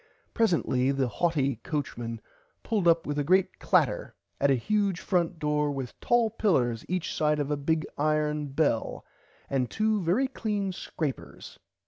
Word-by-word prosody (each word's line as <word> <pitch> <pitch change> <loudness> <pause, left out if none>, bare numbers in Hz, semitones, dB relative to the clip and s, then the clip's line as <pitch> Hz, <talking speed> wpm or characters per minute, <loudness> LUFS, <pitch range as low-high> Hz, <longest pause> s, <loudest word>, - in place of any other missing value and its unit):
Presently 165 - +2
the 135 -2 0
haughty 140 -3 0
coachman 120 -4 -4 0.4
pulled 210 -6 0
up 165 0 +4
with 145 0 -2
a - - +1
great 185 +5 +2
clatter - - +1 0.2
at 140 - +3
a 135 - +5
huge 200 - 0
front 175 -2 0
door 150 -1 0
with 135 -3 -5
tall 235 -2 +2
pillers 125 - +1
each 180 -2 -2
side 150 0 +1
a 145 0 0
big 155 +2 0
iron 150 0 +1
bell 140 -4 0 0.4
and 130 -3 0
two 215 -1 +1
very 190 +11 +2
clean 210 -6 -2
scrapers. 155 -5 -6
155 Hz, 145 wpm, -28 LUFS, 140-185 Hz, 0.4 s, a